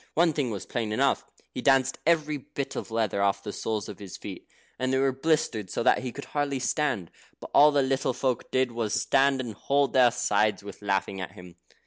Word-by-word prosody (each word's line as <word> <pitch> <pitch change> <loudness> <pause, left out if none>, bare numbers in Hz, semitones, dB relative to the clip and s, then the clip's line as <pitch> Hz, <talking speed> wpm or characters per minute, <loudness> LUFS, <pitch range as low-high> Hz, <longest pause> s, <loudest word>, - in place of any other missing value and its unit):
One 165 0 +4
thing 140 -4 -1
was 100 -4 -5
plain 115 -3 -3
enough. 110 - +2 0.3
He - - -4
danced 135 -1 +3
every 155 -3 +2
bit 140 +1 -6
of - - -5
leather 110 -3 0
off 100 0 +1
the 105 - -5
soles 110 -2 -3
of 105 -4 -9
his 100 -3 -8
feet, - - -9 0.3
and 130 0 0
they 130 - +2
were 135 0 +3
blistered 130 - 0
so 115 - -2
that 125 - +4
he 130 -1 -4
could 140 - -8
hardly 145 -2 -1
stand; 125 - -1 0.3
but - - -10
all 150 +1 +7
the 145 -1 +3
little 135 0 0
folk 125 -1 -2
did 130 -1 +1
was 115 -2 -2
to - - +2
stand 135 0 +3
and 120 -4 -5
hold 140 +6 +1
their 125 -2 +6
sides 105 -2 +1
with 100 0 -10
laughing 95 -1 -1
at 95 - -6
him. 90 -1 -13
125 Hz, 220 wpm, -27 LUFS, 105-140 Hz, 0.3 s, all